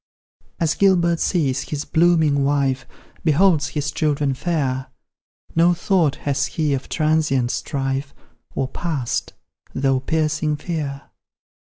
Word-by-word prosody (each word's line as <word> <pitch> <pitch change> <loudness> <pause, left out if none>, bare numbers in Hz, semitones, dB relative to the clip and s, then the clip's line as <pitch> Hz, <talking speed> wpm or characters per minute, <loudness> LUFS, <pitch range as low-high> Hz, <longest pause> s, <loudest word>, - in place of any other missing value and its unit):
As 165 -2 +2
Gilbert 175 -4 +3
sees 140 -7 0
his 150 -1 -3
blooming 160 -4 +3
wife, 135 -2 0 0.4
Beholds 160 -1 +3
his 150 -2 -2
children 145 -3 0
fair, 130 -4 -1 0.7
No 170 +2 +4
thought 170 -5 +2
has 140 0 +1
he 155 -3 -1
of 135 0 -3
transient 150 -6 +1
strife, 135 -1 -2 0.4
Or 135 - 0
past, 145 -4 -3 0.4
though 135 -1 +2
piercing 155 +2 0
fear. 145 -4 -4
150 Hz, 115 wpm, -21 LUFS, 135-165 Hz, 0.7 s, No